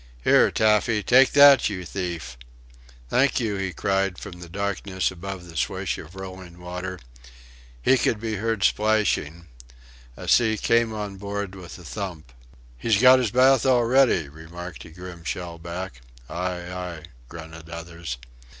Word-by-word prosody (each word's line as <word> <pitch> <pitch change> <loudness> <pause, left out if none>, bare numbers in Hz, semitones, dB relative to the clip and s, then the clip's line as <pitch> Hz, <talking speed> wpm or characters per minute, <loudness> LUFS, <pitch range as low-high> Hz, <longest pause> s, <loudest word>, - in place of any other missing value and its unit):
"Here, - - +5
Taffy 105 0 +2
take 130 +1 +5
that, 140 -4 +7
you 90 -3 -5
thief!" 85 -9 -5 0.7
"Thank 135 +2 +3
you!" 110 -4 -1
he 95 -1 -2
cried 95 -1 0
from 90 - -9
the 85 -1 -10
darkness 95 0 -2
above 95 0 -7
the 85 - -12
swish 70 - -1
of 85 - -11
rolling 95 -2 -9
water. 90 +1 -6 0.9
He 130 - +4
could 110 - +1
be 110 -1 -3
heard 110 0 -1
splashing; 105 -7 +1 0.7
a - - -8
sea 110 -2 +4
came 115 0 +2
on 105 -2 -5
board 100 -1 -4
with 90 -3 -10
a 90 - -13
thump. 80 -2 -6 0.5
"He's 115 -3 +2
got 130 +2 +8
his 125 -4 0
bath 130 +3 +4
already," 125 - +3
remarked 80 +4 -9
a - - -11
grim 90 0 -10
shellback. 85 -4 -6 0.3
"Aye, 90 +1 -4
aye!" 90 -3 -6 0.3
grunted 80 -1 -10
others. 85 -4 -6
95 Hz, 145 wpm, -24 LUFS, 85-110 Hz, 0.9 s, got